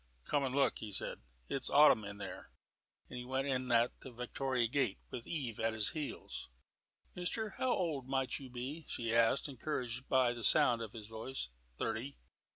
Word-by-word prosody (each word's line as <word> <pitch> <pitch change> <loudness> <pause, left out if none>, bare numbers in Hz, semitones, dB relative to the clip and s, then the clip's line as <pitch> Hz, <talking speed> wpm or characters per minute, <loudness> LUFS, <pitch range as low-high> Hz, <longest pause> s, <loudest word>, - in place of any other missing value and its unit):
"Come 145 - +1
and 130 -1 -1
look," 140 -1 +3
he 110 - -6
said. 95 - -2 0.3
"It's 135 - -1
autumn 145 -6 +7
in 100 0 -6
there," 100 -2 -7 0.6
and 125 - -6
he - - -5
went 130 +2 -1
in 130 -2 0
at 120 +1 +5
the - - -9
Victoria 125 +1 0
gate, 125 -3 +1
with 120 - -6
Eve 130 -10 -3
at 115 0 +1
his 110 -2 +4
heels. 150 -3 -5 0.6
"Mister, 210 +4 -2
how 260 - +2
old 155 -8 -1
might 135 -1 0
you 135 -2 -9
be?" 130 +6 -5
she 115 -1 -2
asked, 115 +5 +4
encouraged 125 -2 -3
by 130 -2 +4
the 120 -1 -7
sound 115 +3 +5
of 110 -2 -5
his 110 -3 -7
voice. 110 - -4 0.3
"Thirty." 130 +6 -2
125 Hz, 180 wpm, -35 LUFS, 115-140 Hz, 0.6 s, autumn